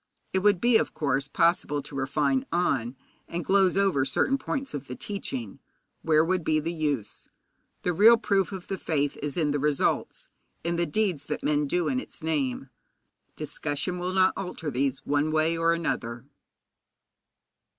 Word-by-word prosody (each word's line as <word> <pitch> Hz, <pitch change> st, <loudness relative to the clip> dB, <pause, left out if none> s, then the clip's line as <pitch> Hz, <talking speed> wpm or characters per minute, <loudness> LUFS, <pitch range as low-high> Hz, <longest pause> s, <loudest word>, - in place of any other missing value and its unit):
It 190 Hz, -, +3 dB
would 205 Hz, -1 st, +3 dB
be, 240 Hz, +1 st, +5 dB
of -, -, -2 dB
course, 140 Hz, -1 st, 0 dB
possible 150 Hz, -3 st, +1 dB
to 145 Hz, -, -10 dB
refine 135 Hz, 0 st, 0 dB
on 135 Hz, -8 st, 0 dB, 0.3 s
and 170 Hz, +1 st, -4 dB
gloze 195 Hz, -1 st, +3 dB
over 195 Hz, -9 st, +3 dB
certain 265 Hz, -, +1 dB
points 270 Hz, 0 st, -4 dB
of 140 Hz, -1 st, -5 dB
the 125 Hz, -, -6 dB
teaching. 130 Hz, -, -5 dB, 0.4 s
Where 155 Hz, 0 st, +3 dB
would 185 Hz, 0 st, 0 dB
be 155 Hz, 0 st, +2 dB
the 165 Hz, +3 st, -3 dB
use? 145 Hz, -9 st, -3 dB, 0.6 s
The 180 Hz, -, +1 dB
real 220 Hz, +7 st, +7 dB
proof 200 Hz, -5 st, +1 dB
of 190 Hz, -2 st, -7 dB
the 195 Hz, -, -4 dB
faith 145 Hz, -3 st, 0 dB
is 145 Hz, +1 st, -4 dB
in 155 Hz, -4 st, +1 dB
the 145 Hz, -, 0 dB
results, 145 Hz, -1 st, 0 dB, 0.4 s
in 170 Hz, +1 st, -1 dB
the 170 Hz, 0 st, 0 dB
deeds 180 Hz, -5 st, -1 dB
that 150 Hz, -, -4 dB
men 150 Hz, -1 st, +1 dB
do 175 Hz, +3 st, 0 dB
in 255 Hz, -, +1 dB
its 220 Hz, -, -11 dB
name. 135 Hz, -4 st, -1 dB, 0.6 s
Discussion 155 Hz, +5 st, -3 dB
will 180 Hz, +1 st, -2 dB
not 190 Hz, 0 st, +4 dB
alter 180 Hz, -5 st, -4 dB
these 135 Hz, +1 st, -1 dB
one 145 Hz, +2 st, +1 dB
way 160 Hz, +1 st, +2 dB
or 165 Hz, 0 st, +2 dB
another. 120 Hz, -8 st, -2 dB
160 Hz, 170 wpm, -27 LUFS, 140-185 Hz, 0.6 s, real